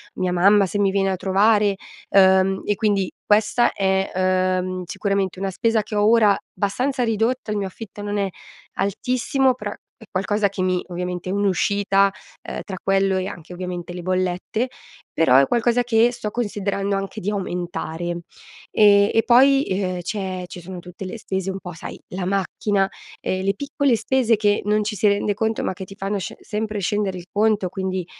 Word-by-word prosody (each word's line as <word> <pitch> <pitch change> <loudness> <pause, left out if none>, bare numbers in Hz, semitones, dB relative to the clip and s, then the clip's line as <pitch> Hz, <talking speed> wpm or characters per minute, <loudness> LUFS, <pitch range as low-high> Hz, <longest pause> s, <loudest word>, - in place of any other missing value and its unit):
mia 185 -1 -1
mamma 200 +3 +5
se 205 +2 -3
mi 200 -1 +3
viene 195 0 +1
a - - 0
trovare. 200 +2 +3 0.3
Uhm, 190 0 +4
e 205 - +1
quindi, 200 -3 +1 0.2
questa 215 +3 +3
è, 190 0 0 0.5
uhm, 185 0 -4
sicuramente 195 0 -1
una 195 0 -1
spesa 225 +4 +1
che 210 +1 -7
ho 205 0 +3
ora 220 -3 +5 0.2
abbastanza 250 +6 -1
ridotta, 225 +1 0
il 210 - -1
mio 200 -1 -1
affitto 205 +1 -10
non 205 0 -3
è 200 -1 0 0.4
altissimo, 255 +6 +1
però 210 -4 -5 0.3
è 235 - -15
qualcosa 200 +2 +1
che 195 -1 -5
mi 185 -1 0
ovviamente 180 0 -4
è - - -1
un'uscita, 200 0 +2 0.4
uhm, - - -4
tra 195 - -5
quello, 195 0 +2
e 185 0 -2
anche 175 -2 -9
ovviamente 180 -1 -5
le 180 - -6
bollette, 185 +6 -1 0.5
però 160 -6 +4
è 135 0 +5
qualcosa 240 +1 +2
che 235 0 +3
sto 235 -3 -5
considerando 200 -3 -1
anche 195 0 -5
di 195 - -1
aumentare. 175 -3 -3 0.5
Ehm, 205 -1 +5
e 225 - +3
poi, 270 +3 +6
e 190 -8 -2
ehm, 185 -2 -2
c'è 185 -1 -4
ci 180 - -9
sono 180 +1 -8
tutte 180 +2 -9
le 185 +5 -6
stese 190 -3 -3
un 190 0 -4
po' 180 - -8
sai: 160 - -8
la 180 0 -4
macchina, 195 +1 0 0.3
ehm, 185 0 -2
le 195 - +2
piccole 280 0 +1
spese 235 0 +2
che 205 -1 +1
non 210 +1 +2
ci 210 0 -3
si 210 - +3
rende 205 0 +2
conto 220 +2 -1
ma - - 0
che 190 0 -8
ti 195 - -12
fanno 200 0 -2
sce 185 - -6
sempre 215 -1 -3
scendere 200 -1 -1
il 175 0 -10
conto 210 -2 +2
quindi, 190 -1 -3
200 Hz, 185 wpm, -22 LUFS, 185-215 Hz, 0.5 s, poi